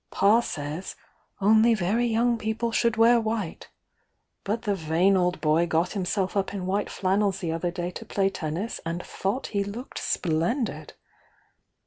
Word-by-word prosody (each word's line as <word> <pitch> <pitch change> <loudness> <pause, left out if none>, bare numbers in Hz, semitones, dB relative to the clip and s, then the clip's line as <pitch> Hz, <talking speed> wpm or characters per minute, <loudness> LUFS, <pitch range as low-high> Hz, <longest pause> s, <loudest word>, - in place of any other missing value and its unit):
Pa 205 +4 +4
says 155 -4 -5 0.5
'only 220 +3 +5
very 215 +5 +1
young 235 +1 +2
people 220 +2 -2
should 230 0 +1
wear 230 +1 +5
white'— 220 -5 -3 0.7
but 215 +3 -2
the 205 - +1
vain 175 +2 +2
old 180 -1 +1
boy 160 +2 +3
got 170 +2 +1
himself 190 0 -1
up 200 0 -1
in 185 -2 -4
white 200 +2 -1
flannels 195 0 +1
the 170 -4 -3
other 165 +2 -1
day 175 0 -4
to - - -8
play 195 -1 +1
tennis 175 +4 -3
and 170 +2 -4
thought 200 +8 -3
he 200 -1 +1
looked 220 +6 -7
splendid! 175 - -1
195 Hz, 155 wpm, -26 LUFS, 175-220 Hz, 0.7 s, only